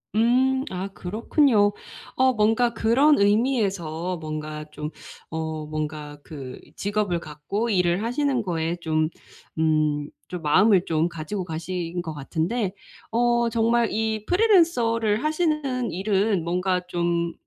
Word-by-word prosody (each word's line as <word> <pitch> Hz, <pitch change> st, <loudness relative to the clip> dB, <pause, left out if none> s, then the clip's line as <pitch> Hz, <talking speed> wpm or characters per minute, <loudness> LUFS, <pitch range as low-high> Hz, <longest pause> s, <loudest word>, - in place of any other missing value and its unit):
음 245 Hz, +4 st, +4 dB, 0.2 s
아 185 Hz, +1 st, -3 dB
그렇군요. 210 Hz, -, +2 dB, 0.4 s
어 260 Hz, 0 st, +4 dB
뭔가 225 Hz, +2 st, +2 dB
그런 260 Hz, +8 st, +4 dB
의미에서 200 Hz, -6 st, +1 dB
뭔가 155 Hz, -1 st, -5 dB
좀 150 Hz, 0 st, -5 dB, 0.4 s
어 160 Hz, -1 st, -4 dB
뭔가 150 Hz, -1 st, -5 dB
그 135 Hz, -5 st, -8 dB, 0.2 s
직업을 205 Hz, -3 st, -1 dB
갖고 170 Hz, +9 st, -4 dB
일을 180 Hz, -1 st, +2 dB
하시는 255 Hz, +2 st, 0 dB
거에 170 Hz, -4 st, -2 dB
좀 155 Hz, -1 st, +1 dB, 0.5 s
음 155 Hz, -2 st, +1 dB, 0.2 s
좀 180 Hz, -2 st, -6 dB
마음을 190 Hz, +5 st, +4 dB
좀 160 Hz, +1 st, +1 dB
가지고 170 Hz, +4 st, -4 dB
가신 175 Hz, +1 st, -4 dB
것 160 Hz, -2 st, -5 dB
같은데 170 Hz, -, -2 dB, 0.4 s
어 235 Hz, 0 st, +2 dB
정말 230 Hz, 0 st, +2 dB
이 220 Hz, -1 st, -1 dB
프리랜서를 305 Hz, -, +3 dB
하시는 305 Hz, -6 st, 0 dB
일은 195 Hz, 0 st, +1 dB
뭔가 180 Hz, +2 st, 0 dB
좀 170 Hz, -1 st, -1 dB
190 Hz, 230 characters per minute, -24 LUFS, 160-230 Hz, 0.5 s, 음